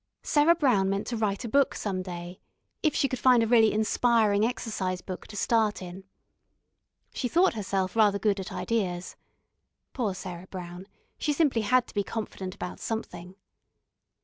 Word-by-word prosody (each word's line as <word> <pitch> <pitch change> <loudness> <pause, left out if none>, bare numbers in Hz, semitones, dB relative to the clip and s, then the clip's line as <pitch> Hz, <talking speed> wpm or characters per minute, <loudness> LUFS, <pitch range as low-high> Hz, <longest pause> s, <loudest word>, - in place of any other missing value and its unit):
Sarah 305 +3 +4
Brown 245 - +2
meant 195 +1 -1
to 240 - -3
write 210 -1 -1
a - - -2
book 280 +4 +2
some 190 -3 -2
day, 175 -1 -7 0.4
if 310 -3 +1
she 275 - +2
could 255 -1 -4
find 250 -3 +5
a - - 0
really 225 -2 +5
inspiring 215 -1 +2
exercise 215 -6 -2
book 185 0 -8
to 210 - -9
start 220 -1 +1
in. 185 +1 -9 1.1
She 250 - -2
thought 350 +8 +3
herself 195 -3 -2
rather 210 -3 +4
good 200 0 +1
at 190 - -6
ideas 185 -6 -2 0.8
poor 220 -8 -1
Sarah 180 -1 -8
Brown, 180 0 -8 0.3
she 300 - 0
simply 285 -6 +2
had 250 +3 +3
to - - -15
be 205 - 0
confident 195 -3 -5
about 180 - -6
something. 185 -5 -5
210 Hz, 165 wpm, -27 LUFS, 185-235 Hz, 1.1 s, find